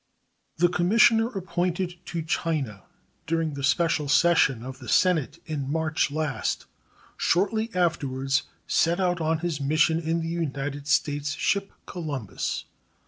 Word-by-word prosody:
The 175 +2 +5
commissioner 225 +6 +4
appointed 180 -3 -2
to 170 -2 -3
China 150 - -2 0.4
during 165 -1 0
the 140 -1 -6
special 150 +1 +2
session 140 -7 +4
of 130 +1 -8
the 120 -4 -9
Senate 165 -5 +2
in 140 -4 -3
March 160 -1 +1
last 145 -4 -2 0.5
shortly 220 +5 +1
afterwards 140 -6 +1 0.2
set 170 +2 +2
out 180 -2 +1
on 160 +1 +1
his 155 -5 -2
mission 155 +3 +3
in 165 0 -1
the 165 - -3
United 145 -4 -3
States 145 0 +1
ship 200 -1 0
Columbus. 145 - -4
160 Hz, 130 wpm, -26 LUFS, 140-175 Hz, 0.5 s, The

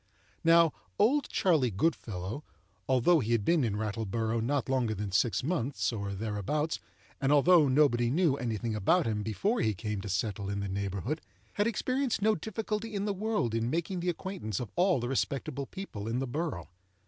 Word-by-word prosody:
Now, 165 -1 +6 0.2
"Old 270 +8 +3
Charley 155 -9 +2
Goodfellow," 105 - -2 0.5
although 130 +6 +4
he 120 -3 0
had 110 -3 +1
been 170 -4 +3
in 110 -4 0
Rattleborough 110 +2 -1
not 130 +1 0
longer 125 -5 +1
than 100 0 -4
six 100 +3 +2
months 130 - -1
or 100 -2 -3
thereabouts, 110 - -2 0.4
and 135 0 +2
although 150 +2 +6
nobody 130 -4 +3
knew 155 +1 +3
any 120 -5 -2
thing 115 +1 -3
about 110 - +2
him 105 -2 -1
before 195 - 0
he 110 -2 +1
came 105 0 -3
to 100 - -6
settle 100 +1 -2
in 100 0 -2
the 100 - -2
neighborhood, 100 - -3 0.3
had 205 +1 +1
experienced 255 +3 0
no 215 +2 +3
difficulty 220 +2 -4
in 200 0 -1
the 205 - 0
world 205 - -1
in 115 +1 0
making 170 +5 -2
the 175 +1 -1
acquaintance 175 - -4
of 120 -5 -5
all 180 -3 +3
the 120 - -3
respectable 135 +1 -2
people 150 - -7
in 115 +2 -1
the 135 - -1
borough. 135 - -3
130 Hz, 185 wpm, -30 LUFS, 110-170 Hz, 0.5 s, Now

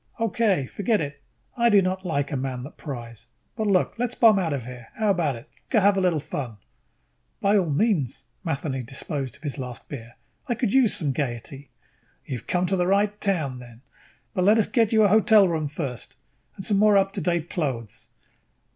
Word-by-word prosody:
"Okay. 220 - +1
Forget 205 - 0
it. 140 -1 -5 0.3
I 235 -1 +3
do 205 -2 +6
not 185 0 -1
like 145 -6 -1
a - - -1
man 130 -1 -3
that 140 - -10
pries. 120 -6 -8 0.3
But 220 -2 -1
look, 190 -3 +2
let's 245 0 -1
bomb 220 -4 +6
out 170 -4 -1
of 135 -5 -3
here, 125 -2 -9
how 215 -2 +2
about 160 -8 0
it? 115 +5 -11 0.2
Go 225 - +4
have 200 0 +4
a 195 - +1
little 175 -4 +2
fun." 130 -6 -5 0.8
"By 200 +1 +3
all 185 -5 +2
means." 155 - 0 0.2
Matheny 140 -5 -2
disposed 135 +2 -4
of 140 - -19
his 145 -1 -4
last 125 -2 -7
beer. 120 -4 -8 0.3
"I 240 - 0
could 230 -3 -1
use 260 -5 +4
some 145 -4 0
gaiety." 135 0 -4 0.6
"You 125 - -4
have - - -21
come 180 0 +1
to 190 +2 +1
the 180 -1 +1
right 205 +2 +1
town 155 -11 0
then. 120 -1 -13 0.5
But 180 - +1
let 210 +3 +6
us 220 - +3
get 230 -4 +1
you 220 -1 +5
a - - +6
hotel 215 0 +5
room 160 -3 -1
first 140 -5 -6 0.4
and 195 - -7
some 205 - +2
more 210 0 +5
up 195 0 +2
to 195 - -3
date 170 0 -1
clothes." 130 - -3
170 Hz, 205 wpm, -25 LUFS, 135-205 Hz, 0.8 s, do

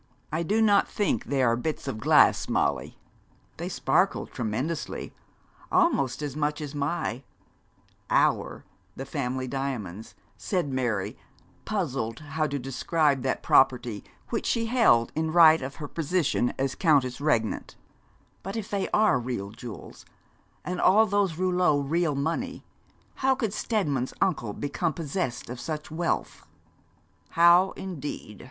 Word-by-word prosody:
'I 160 - 0
do 210 +7 +1
not 205 -2 +4
think 200 - -1
they 135 -1 0
are 115 -1 +3
bits 150 +4 -4
of 130 -5 -3
glass, - - +4
Molly.' - - 0 0.6
'They - - -4
sparkled - - +1
tremendously 125 +8 -3 0.6
almost 335 - +2
as 145 -2 -4
much 150 0 -1
as 150 -3 -6
my 145 -3 -2 0.9
our - - +1 0.3
the 135 - -6
family 130 -2 -3
diamonds,' 120 -7 -5 0.2
said 175 -8 -2
Mary, 120 -7 -2 0.5
puzzled 135 - -2
how 155 +1 -2
to 145 - -3
describe 140 +2 0
that 130 +1 -2
property 125 -5 +3 0.3
which 230 - -2
she 230 -1 +1
held 225 - +3
in 160 0 -1
right 160 -1 +7
of 135 +2 -6
her 150 - -6
position 160 -5 0
as 135 0 -1
countess 140 -7 +2
regnant; 115 -8 0 0.7
'but 195 - -6
if 220 -3 -5
they 200 -2 -1
are 215 -11 +3
real 120 -5 -4
jewels, 120 -1 -10 0.6
and 180 0 -3
all 210 +4 +6
those 200 -5 0
rouleaux 180 -4 +2
real 150 +2 0
money, 165 - -3 0.5
how 265 0 +2
could 225 -6 -2
Steadman's 150 - -1
uncle 150 - 0
become 155 - -2
possessed 150 -3 -3
of 125 +1 -7
such 155 0 -5
wealth?' 170 +2 -2 0.9
'How, 170 +3 +6
indeed?' 145 - -7
150 Hz, 135 wpm, -27 LUFS, 130-180 Hz, 0.9 s, right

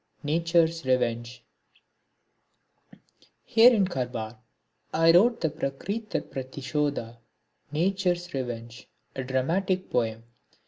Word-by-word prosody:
(37) 150 +1 -1
Nature's 165 0 +2
Revenge 120 -1 0 2.0
Here 230 +2 +7
in 210 -5 +3
Karwar 125 -7 -4 0.5
I 165 +1 +5
wrote 225 +8 +4
the 160 - +1
Prakritir 200 +13 -3
Pratishodha, 135 -2 -3 0.5
Nature's 175 +1 0
Revenge, 120 -3 -5 0.3
a 130 - -3
dramatic 170 +9 -1
poem. 115 -2 0
150 Hz, 90 wpm, -27 LUFS, 125-180 Hz, 2.0 s, Here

